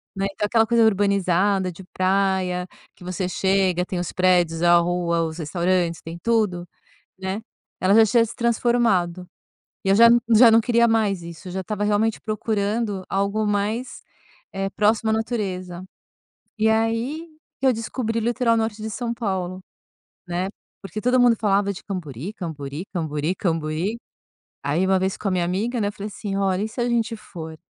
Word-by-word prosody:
né. 195 0 -1
Então 210 - -1
aquela 225 +1 +3
coisa 235 0 +4
urbanizada 195 -2 +2
de 175 - -12
praia 185 -1 +1 0.3
que 180 - -15
você 180 0 -3
chega, 190 -2 +1
tem 185 -1 -4
os 175 - -3
prédios, 175 -3 +2
a 175 0 +6
rua, 170 -1 0
os 160 0 -4
restaurantes, 175 +1 0
tem 165 +1 -8
tudo, 210 -7 0 0.5
né, 190 +3 -3 0.4
ela 185 +2 +3
já 225 0 +7
tinha 230 +2 +3
se 225 - -8
transformado. 230 -7 +1 0.6
E 195 - +1
eu - - +6
já 230 +3 +8 0.3
já 230 +1 +8
não 225 +1 +6
queria 235 0 +3
mais 210 -5 +1
isso, 170 +3 -9
eu - - -7
já 190 - -3
estava 205 +2 -3
realmente 210 +2 +1
procurando 215 -1 -2
algo 200 +2 0
mais, 210 +4 -2 0.5
eh, 195 0 -2
próximo 215 +2 +1
à - - +2
natureza. 190 -6 -3 0.7
E 220 +1 +3
aí 230 +9 0 0.3
que 270 - +1
eu 260 - +5
descobri 230 0 -3
o - - -1
litoral 235 0 +2
norte 220 -1 -2
de 220 - -4
São 235 +1 -3
Paulo, 190 -5 -3 0.7
né, 180 +2 -2 0.3
porque 195 +2 -6
todo 250 +2 +3
mundo 240 -2 +5
falava 200 -1 +1
de 195 - -10
Cambori, 170 - -5
Cambori, 155 -4 -6
Cambori, 155 -1 -2
Cambori, 165 +5 -1 0.7
aí 150 +6 +1
uma 190 0 +3
vez 190 +1 -1
com 210 - -4
a - - +1
minha 180 -2 +1
amiga, 215 +8 -1
né, 205 - +1
eu - - -2
falei 205 0 -7
assim: 205 -1 -5
"Ó, 195 -1 +1
e 200 +4 -1
se 220 - -9
a 240 - +1
gente 230 -1 0
for?". 160 -7 -9
195 Hz, 180 wpm, -23 LUFS, 180-220 Hz, 0.7 s, já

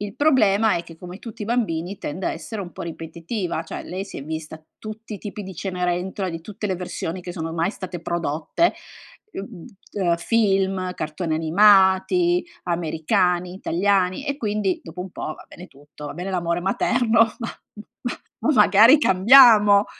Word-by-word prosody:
Il 205 -1 -6
problema 225 -8 +3
è 170 - -3
che, 165 -1 -13
come 180 +2 -10
tutti 220 -1 -9
i - - -3
bambini, 200 -6 -1
tende 170 +6 -5
a - - 0
essere 220 -2 -7
un 180 -3 -7
po' - - -9
ripetitiva, 170 +2 -5
cioè 165 - -7
lei 185 +2 -5
si 200 - -10
è - - -7
vista 160 0 -7 0.2
tutti 215 0 -8
i - - -8
tipi 210 0 -7
di 190 -1 -9
Cenerentola 180 +1 -2
di 165 -1 -5
tutte 210 +3 -6
le 190 -2 -2
versioni 180 0 -5
che 175 - -7
sono 165 -2 -5
mai 165 +3 0
state 185 -4 -7
prodotte, 170 - -1 0.6
mhmm, 195 -3 -8 0.3
ehm, 175 -4 +1
film, 195 -2 0
cartoni 155 +1 -3
animati, 195 - +4 0.2
americani, 175 +2 0
italiani 190 +3 0
e 280 - -2
quindi 210 -6 -1
dopo 165 +1 -9
un 180 0 -6
po', 155 - -5
va - - -15
bene 180 - -12
tutto, 145 -1 -15
va - - -6
bene 180 +4 -5
l'amore 170 -2 -1
materno, 225 +5 +1 0.2
ma, 230 - -4 0.5
ma, 245 - -2 0.3
ma 305 - +2
magari 220 +4 +6
cambiamo. 210 -2 +6
190 Hz, 170 wpm, -22 LUFS, 170-210 Hz, 0.6 s, magari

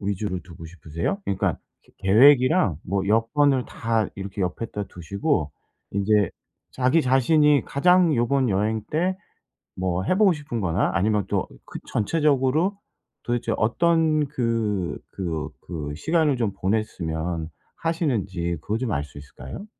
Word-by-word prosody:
위주로 100 -1 -2
두고 85 -2 -11
싶으세요? 80 - -4
그러니까 95 -1 0 0.3
그 - - -25
계획이랑 130 - +5
뭐 95 +1 -1
여건을 130 +4 +2
다 115 -2 -1
이렇게 100 0 -4
옆에다 105 +3 -3
두시고 95 - -2 0.4
인제 100 0 +2 0.4
자기 130 +6 +2
자신이 145 +3 +4
가장 175 +2 +4
요번 125 +2 +2
여행 105 +3 0
때 180 +4 0 0.6
뭐 90 0 -1
해보고 190 - +4
싶은 145 -7 -5
거나 90 +1 +1
아니면 105 +2 +1
또 - - 0 0.2
그 - - -8
전체적으로 150 - +1 0.5
도대체 120 -1 -1
어떤 155 +5 +2
그 115 -8 -1
그 80 -5 -4
그 75 -4 -6
시간을 155 - +1
좀 110 -4 0
보냈으면 85 -5 -2 0.3
하시는지 100 - -1
그거 110 +5 -2
좀 120 -2 -2
알 70 0 -1
수 75 - -13
있을까요? 70 - -9
110 Hz, 280 characters per minute, -24 LUFS, 95-145 Hz, 0.6 s, 계획이랑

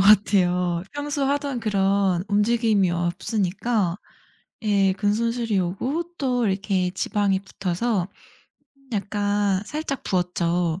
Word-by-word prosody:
같아요. 180 -4 +4
평소 290 0 -3
하던 280 -2 -1
그런 195 -3 +1
움직임이 210 -2 +2
없으니까 180 +2 -1 0.7
예, 200 -3 +3
근손실이 225 +2 0
오고 265 - -2
또 250 -5 0
이렇게 190 -2 0
지방이 195 -1 0
붙어서 195 +1 -2 0.8
약간 205 -1 0
살짝 280 +3 -4
부었죠. 175 -2 0
200 Hz, 230 characters per minute, -24 LUFS, 185-230 Hz, 0.8 s, 같아요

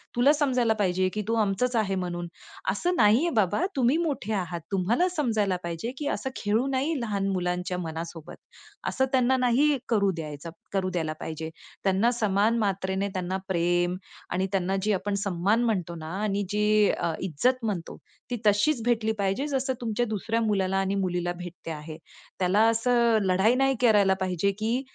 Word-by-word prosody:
तुला 245 +4 +5
समजायला 255 -6 +2
पाहिजे 185 -1 +2
की 210 - -2
तू 225 - 0
आमचंच 215 +5 0
आहे 205 -4 +1
म्हणून." 175 -2 -3 0.4
असं 355 +1 -1
नाही 215 -4 +5
आहे - - +2
बाबा, 210 - +2
तुम्ही 260 +2 +3
मोठे 285 - -2
आहात, 180 -4 -3
तुम्हाला 205 - +2
समजायला 225 - 0
पाहिजे 170 +7 -4
की 295 - -3
असं 265 - -4
खेळू 215 +4 0
नाही 275 +3 0
लहान 200 -4 -1
मुलांच्या 180 0 -2
मनासोबत. 165 -1 -6 0.5
असं 265 - +1
त्यांना 260 0 +3
नाही 260 +4 +3
करू 200 -4 +3
द्यायचं 155 -1 -6 0.2
करू 190 -1 0
द्यायला 160 -4 -2
पाहिजे. 160 0 -5 0.3
त्यांना 195 +5 +3
समान 215 -1 +1
मात्रेने 195 -1 -1
त्यांना 185 0 -2
प्रेम 175 -1 +1 0.3
आणि 185 +1 0
त्यांना 190 -1 0
जे 210 +2 +1
आपण 200 +2 -2
सन्मान 200 +4 +1
म्हणतो 180 -7 -1
ना 160 -1 -7
आणि 205 -1 0
जी 210 0 +3
अ, 170 -1 -1
इज्जत 235 - 0
म्हणतो 195 -7 -3 0.3
ती 245 - -1
तशीच 215 +6 +3
भेटली 225 -2 +2
पाहिजे 200 +8 0
जसं 270 -2 -1
तुमच्या 235 0 0
दुसऱ्या 225 +1 -1
मुलाला 195 -3 +1
आणि 195 +1 0
मुलीला 180 -2 -1
भेटते 175 -1 -8
आहे. 155 0 -7 0.4
त्याला 185 +3 +3
असं 235 0 +3
लढाई 190 +5 +3
नाही 270 +1 +2
करायला 205 -5 +5
पाहिजे 185 +2 0
की 230 +4 0
205 Hz, 165 wpm, -27 LUFS, 180-235 Hz, 0.5 s, तुला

